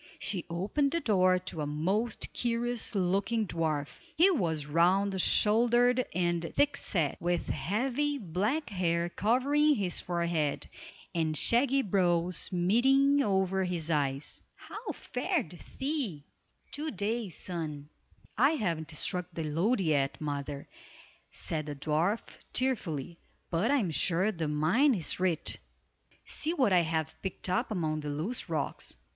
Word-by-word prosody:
She 195 -3 -2
opened 200 - 0
the 335 - +1
door 185 - +3
to 180 -3 -5
a 145 - -2
most 190 +10 -1
curious 240 -1 -1
looking 200 +4 +1
dwarf. 155 -5 -2 0.2
He 365 +5 +6
was 165 - 0
round 185 +5 +2
shouldered 240 +5 +4
and 175 -1 +1
thick 285 0 +3
set, 165 - 0
with 175 0 -1
heavy, 250 - -1
black 210 - -2
hair 170 -2 0
covering 280 +10 +2
his 195 -6 -1
forehead, 170 -4 -1 0.5
and 160 -2 0
shaggy 270 - +3
brows 180 -3 +2
meeting 265 +10 +3
over 190 -4 +1
his 170 -3 -2
eyes. 140 -2 -1
"How 440 +2 -7
fared 230 - -3 0.2
thee, 265 - -1 0.5
to 305 +2 -3
day, 215 - -2
son?" 160 -5 -5 0.5
"I 275 +6 +5
haven't 165 - -2
struck 175 +3 -1
the 165 -1 -4
lode 180 +10 +1
yet, 145 -5 +1
mother," 145 -1 -4 0.6
said 155 -2 -3
the 145 - -4
dwarf, 160 +9 0 0.3
cheerfully, 175 - -1 0.3
"but 175 +7 +1
I 285 - +4
am 195 -10 0
sure 180 +6 +2
the 165 -5 -3
mine 175 - +3
is 175 -2 -2
rich. 180 -4 0 0.7
See 320 +3 -2
what 255 - +3
I 180 - +6
have 160 -1 -2
picked 190 -1 -3
up 185 +8 0
among 160 -7 -1
the 150 -1 -5
loose 165 +9 -3
rocks!" 155 - -3
185 Hz, 135 wpm, -30 LUFS, 160-240 Hz, 0.7 s, He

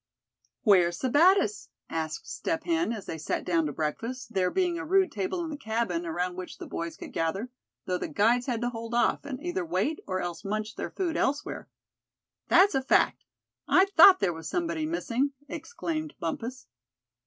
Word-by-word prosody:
"Where's 180 -6 +4
Sebattis?" 360 - +3 0.2
asked 160 -1 -4
Step 325 -2 -2
Hen, 335 -5 +1
as 215 -4 -5
they 160 - -5
sat 155 - -2
down 165 -3 +2
to - - -3
breakfast, 230 - -4
there 185 -2 +2
being 355 - 0
a - - -4
rude 380 +1 +3
table 215 - -2
in 325 - -5
the 295 - -5
cabin, 220 -8 -2
around 180 +2 -2
which 185 0 -7
the - - -8
boys 170 0 -5
could - - -9
gather; 190 +9 -2 0.3
though 180 -1 -1
the - - -3
guides 235 - +2
had 235 -3 -1
to 245 0 -1
hold 230 0 -5
off, 240 - +2
and 270 -3 -5
either 355 +1 -2
wait, 320 -2 -1
or 185 -1 -1
else 175 0 -4
munch 215 +2 -3
their - - -4
food 350 -4 -2
elsewhere. 285 +2 -1 0.8
"That's 375 +4 +6
a 270 - +2
fact; 260 - +2 0.4
I 375 - +6
thought 370 +3 +9
there 175 - +1
was 160 0 -7
somebody 330 -3 -1
missing!" 280 -4 -1
exclaimed 315 -2 -4
Bumpus. 230 +10 -4
245 Hz, 180 wpm, -28 LUFS, -, 0.8 s, thought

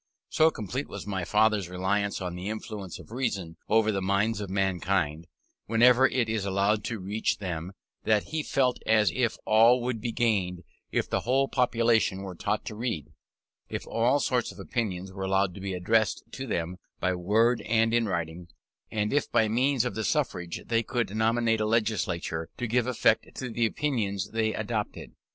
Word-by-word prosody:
So 160 +1 +4
complete 125 - -4
was - - -7
my 95 -3 -2
father's 105 -2 +2
reliance 100 +3 -1
on 90 -2 -3
the 90 +3 -5
influence 105 -4 -6
of - - -14
reason 100 -10 -3
over 110 0 +4
the 100 -2 -1
minds 100 +3 +1
of 100 - -5
mankind, 90 -4 0 0.4
whenever 125 +3 +6
it 125 -4 0
is 110 -2 -1
allowed 100 +2 +1
to 115 - -2
reach 100 +3 -1
them, 90 -1 -5 0.3
that 105 -2 +1
he 155 0 -1
felt 130 -4 +1
as 110 -3 +4
if 125 -3 0
all 115 +3 +6
would 120 -3 -2
be 120 0 -2
gained 95 -7 0 0.3
if - - 0
the - - 0
whole 135 +3 +2
population 115 -6 +2
were 95 -2 -6
taught 105 +5 -2
to 105 - -6
read, 110 - -3 0.6
if - - -4
all 120 +5 +2
sorts 125 -3 0
of - - -15
opinions 95 -5 -3
were 95 - -7
allowed 95 -1 +1
to 95 - -9
be 95 -1 -3
addressed 110 +5 +1
to 135 0 -6
them 90 -4 -2 0.2
by 95 - +1
word 110 +7 +2
and 115 +1 +2
in 115 -1 +2
writing, 85 -2 -3 0.4
and 105 +1 -1
if 145 - +1
by 110 - +3
means 125 +3 +2
of 125 - -2
the 110 - -3
suffrage 90 -4 -1
they 115 -1 +1
could 115 -3 -2
nominate 115 0 +2
a - - +1
legislature 95 -7 -1
to 125 - -2
give 120 +1 +1
effect 125 - +1
to 125 - -4
the 115 0 +2
opinions 110 -9 -2
they 110 -1 +1
adopted. 110 -1 -4
110 Hz, 180 wpm, -28 LUFS, 95-115 Hz, 0.6 s, whenever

